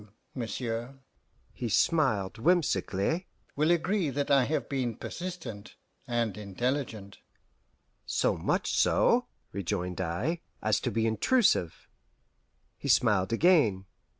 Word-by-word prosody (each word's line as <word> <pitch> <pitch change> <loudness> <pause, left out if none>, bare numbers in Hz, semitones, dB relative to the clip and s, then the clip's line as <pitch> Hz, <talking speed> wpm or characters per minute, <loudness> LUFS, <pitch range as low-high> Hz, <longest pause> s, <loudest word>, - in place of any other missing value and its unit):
You, 105 - -18 0.2
monsieur" 120 +1 -4 0.5
he 120 - -4
smiled 110 - +1
whimsically 160 - +1 0.3
"will 150 +3 +2
agree 175 0 +1
that 140 +2 -2
I 135 -3 +5
have 155 +5 -1
been 125 -5 -2
persistent 165 - -7 0.3
and 115 -4 -1
intelligent." 110 0 -3 0.9
"So - - +1
much - - -1
so," - - +3 0.2
rejoined 90 -1 -3
I, 110 - -2 0.2
"as 110 0 +1
to - - -2
be 115 0 0
intrusive." 115 - +2 0.9
He - - -5
smiled 110 -7 +3
again. 115 - +3
120 Hz, 110 wpm, -29 LUFS, 105-155 Hz, 0.9 s, I